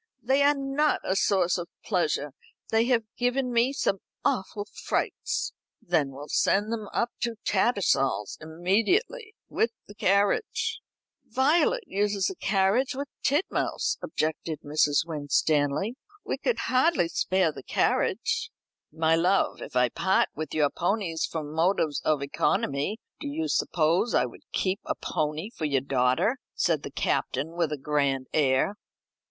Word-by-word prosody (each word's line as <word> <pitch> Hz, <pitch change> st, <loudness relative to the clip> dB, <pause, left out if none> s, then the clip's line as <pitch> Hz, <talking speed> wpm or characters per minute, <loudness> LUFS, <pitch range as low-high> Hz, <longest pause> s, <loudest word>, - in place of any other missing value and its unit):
"They 265 Hz, +4 st, +3 dB
are 290 Hz, +1 st, +5 dB
not 275 Hz, +2 st, +1 dB
a 190 Hz, -, 0 dB
source 185 Hz, -3 st, +2 dB
of 175 Hz, -, -6 dB, 0.2 s
pleasure. 155 Hz, -7 st, 0 dB, 0.4 s
They 225 Hz, +1 st, +3 dB
have 240 Hz, -2 st, +2 dB, 0.2 s
given 250 Hz, +1 st, 0 dB
me 235 Hz, +3 st, +3 dB
some 195 Hz, -8 st, 0 dB, 0.3 s
awful 205 Hz, +1 st, -1 dB
frights." -, -, -2 dB, 0.3 s
"Then 160 Hz, -6 st, +1 dB
we'll 140 Hz, +2 st, -9 dB
send 205 Hz, +7 st, +2 dB
them 215 Hz, -2 st, -4 dB
up 235 Hz, 0 st, 0 dB
to 235 Hz, -1 st, -1 dB
Tattersall's 135 Hz, -, +1 dB
immediately, 230 Hz, -, 0 dB
with 230 Hz, -, +1 dB, 0.2 s
the 205 Hz, -, -12 dB
carriage." 210 Hz, -, +1 dB, 0.5 s
"Violet 310 Hz, -, +2 dB
uses 205 Hz, -, 0 dB
the 385 Hz, -, -1 dB
carriage 205 Hz, -, +1 dB
with 280 Hz, +1 st, -4 dB
Titmouse." 295 Hz, +7 st, 0 dB
objected 155 Hz, -, -2 dB
Mrs. 145 Hz, +1 st, +2 dB
Winstanley. 150 Hz, -, 0 dB, 0.3 s
"We -, -, -2 dB
could -, -, 0 dB
hardly 325 Hz, -, +2 dB
spare 185 Hz, 0 st, +1 dB
the -, -, -9 dB
carriage." 465 Hz, 0 st, 0 dB, 0.4 s
"My 160 Hz, +1 st, +2 dB
love, 180 Hz, +4 st, +2 dB
if -, -, -8 dB
I 125 Hz, -1 st, +4 dB
part 190 Hz, +10 st, +2 dB
with 155 Hz, +1 st, -5 dB
your 150 Hz, -2 st, +3 dB
ponies 175 Hz, -3 st, -1 dB
from 155 Hz, -2 st, -5 dB
motives 160 Hz, -2 st, +1 dB
of 150 Hz, -3 st, +1 dB
economy, 150 Hz, +4 st, 0 dB, 0.2 s
do 295 Hz, -, -5 dB
you 315 Hz, +3 st, -2 dB
suppose 170 Hz, -, +1 dB
I -, -, +4 dB
would -, -, -10 dB
keep 190 Hz, +1 st, 0 dB
a -, -, -2 dB
pony 155 Hz, +7 st, -2 dB
for 160 Hz, -, -4 dB
your 140 Hz, -3 st, +2 dB
daughter?" 135 Hz, -, +1 dB, 0.2 s
said 165 Hz, -4 st, +1 dB
the -, -, -6 dB
Captain 140 Hz, +2 st, -1 dB
with 170 Hz, -2 st, -1 dB
a 150 Hz, -, -2 dB
grand 140 Hz, -2 st, 0 dB
air. 140 Hz, +4 st, +2 dB
190 Hz, 145 wpm, -27 LUFS, 155-245 Hz, 0.5 s, are